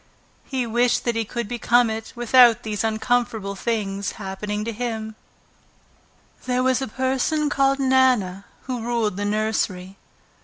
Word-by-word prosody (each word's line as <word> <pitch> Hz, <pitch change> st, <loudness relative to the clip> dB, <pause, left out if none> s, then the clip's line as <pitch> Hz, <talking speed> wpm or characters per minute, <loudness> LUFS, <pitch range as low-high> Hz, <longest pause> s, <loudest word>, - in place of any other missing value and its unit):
He 260 Hz, -3 st, -2 dB
wished 240 Hz, +2 st, +1 dB
that 235 Hz, -1 st, 0 dB
he 225 Hz, -1 st, -1 dB
could 235 Hz, +1 st, -4 dB
become 240 Hz, +1 st, +2 dB
it 220 Hz, 0 st, -6 dB
without 240 Hz, -1 st, +5 dB
these 215 Hz, -2 st, -3 dB
uncomfortable 220 Hz, -2 st, 0 dB
things 200 Hz, -3 st, -2 dB
happening 210 Hz, +1 st, -4 dB
to 230 Hz, -, -2 dB
him. 220 Hz, -1 st, -4 dB, 1.3 s
There 250 Hz, 0 st, +1 dB
was 260 Hz, 0 st, +2 dB
a 265 Hz, -, -2 dB
person 265 Hz, +5 st, 0 dB
called 275 Hz, 0 st, +2 dB
Nana 255 Hz, -8 st, +2 dB, 0.2 s
who 250 Hz, -3 st, -4 dB
ruled 230 Hz, -3 st, -1 dB
the 205 Hz, +1 st, -3 dB
nursery. 205 Hz, -3 st, -2 dB
230 Hz, 140 wpm, -23 LUFS, 210-250 Hz, 1.3 s, without